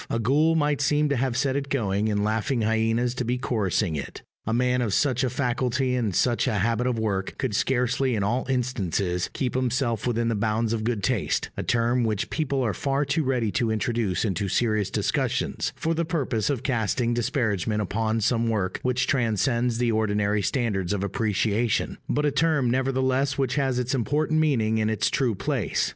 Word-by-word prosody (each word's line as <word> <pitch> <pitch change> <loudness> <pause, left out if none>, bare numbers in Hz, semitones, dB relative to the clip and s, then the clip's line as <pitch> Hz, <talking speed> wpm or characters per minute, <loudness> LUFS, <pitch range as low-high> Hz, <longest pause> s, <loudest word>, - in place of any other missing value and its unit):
A - - 0
ghoul 145 +8 +2
might 145 -2 +1
seem 150 +1 +2
to 140 - +1
have 125 -1 0
set 135 0 +1
it 140 0 -2
going, 105 -5 0
and 105 -1 0
laughing 110 +3 0
hyenas 115 +2 +1
to 125 - -3
be 125 +1 -1
chorusing 105 -7 0
it. 70 - -6 0.2
A - - 0
man 125 +1 +2
of 110 -5 0
such 130 -3 +1
a 130 - +1
faculty 125 0 0
and 115 -7 -1
such 120 +1 +2
a 120 - 0
habit 115 +4 +1
of 125 -2 0
work 100 -4 -2
could 130 -6 -2
scarcely, 125 +1 +1
in 100 - 0
all 120 +6 -1
instances, 100 -8 -1
keep 125 -2 -2
himself 125 -3 0
within 115 -1 0
the 115 - +1
bounds 110 +1 0
of 110 -1 -2
good 110 -3 -1
taste 125 -4 0
a - - -3
term 120 +1 +1
which 110 -3 -1
people 140 -4 -1
are 110 -4 0
far 140 +8 -1
too 145 +3 0
ready 125 -5 0
to 120 -1 0
introduce 110 -2 0
into 100 -1 -1
serious 110 -2 +1
discussions, - - -1
for 165 0 -1
the 165 +1 0
purpose 145 - -1
of 135 -4 -1
casting 120 -1 0
disparagement 115 -4 0
upon 110 +3 -1
some 115 +1 +1
work 100 -4 -1
which 125 0 0
transcends 120 -1 +1
the 120 -1 +1
ordinary 105 -1 +1
standards 100 -4 -1
of 100 -1 -2
appreciation, 110 +2 0
but 150 - +1
a 145 - +2
term 145 -4 +2
nevertheless 130 +1 +1
which 135 -3 0
has 135 -3 0
its 125 +2 -1
important 150 +5 +1
meaning 110 -8 +2
and 110 - +1
its 110 - 0
true 125 -6 +1
place. 100 +1 -1
120 Hz, 190 wpm, -25 LUFS, 110-130 Hz, 0.2 s, ghoul